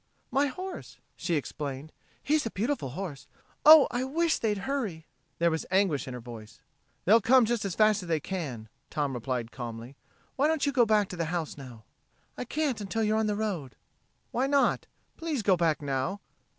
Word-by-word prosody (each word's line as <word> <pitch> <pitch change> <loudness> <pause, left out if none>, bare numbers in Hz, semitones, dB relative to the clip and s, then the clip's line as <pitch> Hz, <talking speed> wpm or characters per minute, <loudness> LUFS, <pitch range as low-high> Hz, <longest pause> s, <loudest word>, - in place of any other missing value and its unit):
"My 280 +2 +3
horse," 370 +8 -7 0.2
she 170 - -1
explained. 145 0 -4 0.3
"He's 305 +1 +2
a - - -2
beautiful 225 - -2
horse.... 155 -1 -6 0.4
Oh, 310 -2 +10
I 245 +1 -1
wish 320 +5 +1
they'd 210 -2 0
hurry." 220 - -3 0.3
There 170 0 +3
was 160 - -1
anguish 185 -8 +2
in 130 - -5
her - - -6
voice. 115 -2 -11 0.4
"They'll 225 +5 +6
come 255 +2 +5
just 230 -2 -1
as 195 - -3
fast 215 -1 +4
as 180 - -9
they 160 -2 +2
can," 140 -11 -5 0.3
replied 125 -4 -2
Tom - - -20
calmly. 120 +1 -7 0.4
"Why 280 +3 +4
don't 315 -2 +1
you 285 - +1
go 245 -4 +4
back 210 -2 +3
to - - -6
the 165 - 0
house 165 -1 -3
now!" 125 -6 -11 0.5
"I - - -5
can't 280 -4 -1
until 220 +3 -1
you're 215 +1 +2
on 220 - +1
the 210 - 0
road." 195 - -3 0.6
"Why 255 +3 +1
not? 280 0 +2 0.3
Please 315 -8 -2
go 195 -2 +4
back 165 -3 +1
now." 140 +8 -1
195 Hz, 190 wpm, -29 LUFS, -, 0.6 s, Oh